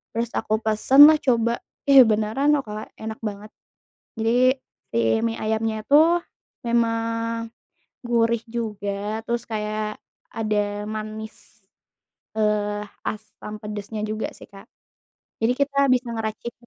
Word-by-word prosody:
terus 230 0 -1
aku 215 - 0
pesen 260 +7 +7
lah 305 - +2
coba, 235 -2 +1 0.3
ih 275 -1 +9
beneran 220 +8 +2
loh 280 - -1
Kak, 215 -1 -8
enak 220 0 -7
banget. 210 0 -5 0.7
Jadi 250 +4 +3 0.3
si - - -1 0.2
mie 230 0 -1
ayamnya 220 0 -2
itu 285 - +2 0.7
memang 230 0 0 0.6
gurih 235 -1 +1
juga, 210 -1 -4
terus 235 0 -2
kayak 215 -1 -3 0.4
ada 210 -1 -1
manis, 215 0 -8 0.7
eee, 210 -1 0 0.2
asam 215 0 -6
pedasnya 210 0 -5
juga 215 +1 -3
sih - - -12
Kak. 195 -1 -14 0.8
Jadi, 225 +2 +3
kita 280 -1 +2
bisa 250 -1 +2
ngeracik 225 +1 -4
220 Hz, 120 wpm, -23 LUFS, 215-235 Hz, 0.8 s, ih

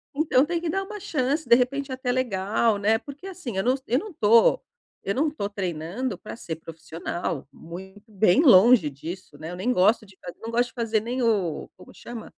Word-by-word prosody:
Então 290 -3 +3
tem 340 +1 -2
que 340 - -2
dar 390 +4 -1
uma 420 +2 -8
chance, 295 -6 -1
de 235 - +9
repente 270 +2 -1
até 255 -1 -2
legal, 220 -2 +1
né, 215 +2 +2
porque 285 +7 -11
assim, 335 - -6
eu 190 - +1
não 250 +2 +3
eu 245 - +2
não 425 - -8
estou 230 -6 +4 0.4
eu 195 - -2
não 300 +3 +2
estou 205 -9 -4
treinando 190 +5 -4
para 215 - -9
ser 165 -8 -6
profissional, 165 -2 -5
muito 190 +6 -11
bem 205 - +4
longe 215 - +7
disso 155 +3 -9
né, 160 +2 -6
eu - - -6
nem 190 +8 -1
gosto 210 +4 +3
de 195 -2 -19 0.2
não 225 - -6
gosto 240 +1 +2
de - - -23
fazer 230 -2 0
nem 245 +3 -3
o 195 -9 0
como 180 - -15
chama? 235 -2 -9
225 Hz, 205 wpm, -25 LUFS, 190-260 Hz, 0.4 s, de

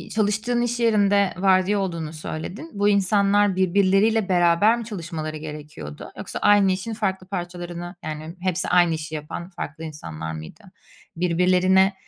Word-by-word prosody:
çalıştığın 215 +3 +1
iş 240 0 -1
yerinde 205 -3 +3
vardiya 190 +1 +3
olduğunu 165 -5 -3
söyledin. 160 - -6
Bu 205 0 +2
insanlar 200 0 +3
birbirleriyle 195 +3 +3
beraber 175 +6 +4
mi 230 - -6
çalışmaları 165 -6 -5
gerekiyordu 150 - -8
yoksa - - -5
aynı 205 -2 +5
işin 195 +5 -3
farklı 190 -4 -2
parçalarını, 175 -1 -6
yani, 155 +2 -6
hepsi 185 -1 -1
aynı 175 -2 +4
işi 155 0 -5
yapan 165 +4 -6
farklı 160 -3 -7
insanlar 80 - -6
mıydı? 80 - -10 0.5
Birbirlerine, 185 +2 +3
185 Hz, 135 wpm, -23 LUFS, 165-205 Hz, 0.5 s, aynı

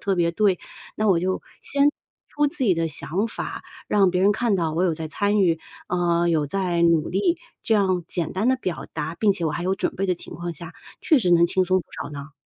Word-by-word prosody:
特 195 -2 0
别 170 -1 +2
对。 195 -1 +2 0.4
那 215 - 0
我 170 - +1
就 185 +1 -1 0.2
先 285 +1 +2 0.4
说 295 0 +1
自 270 -2 -2
己 195 - +4
的 165 -1 0
想 185 +8 -2
法， - - -5 0.2
让 195 -3 +3
别 180 +1 0
人 200 +2 +5
看 220 -2 +1
到 165 -3 -1
我 165 +3 0
有 175 -3 +2
在 160 0 -5
参 205 +5 0
与， 165 -3 +2 0.3
啊， 175 -1 +1
有 160 -3 +1
在 180 +1 -1
努 170 -2 +3
力， 205 - +1 0.3
这 225 - +2
样 185 -4 +2
简 170 -4 -2
单 205 +6 0
地 260 - +3
表 185 -9 -4
达， 160 +1 -3
并 210 +1 +3
且 180 -3 -4
我 155 - +1
还 175 - -3
有 185 +2 +1
准 195 - -2
备 195 +1 -1
的 180 - +1
情 - - -9
况 175 +1 -5
下， 165 +1 -9 0.3
确 315 -6 +4
实 185 -6 +1
能 170 0 +6
轻 185 +2 +2
松 185 +1 +3
不 - - -15 0.2
少 - - -7
呢。 145 +1 -8
180 Hz, 260 characters per minute, -23 LUFS, 170-205 Hz, 0.4 s, 能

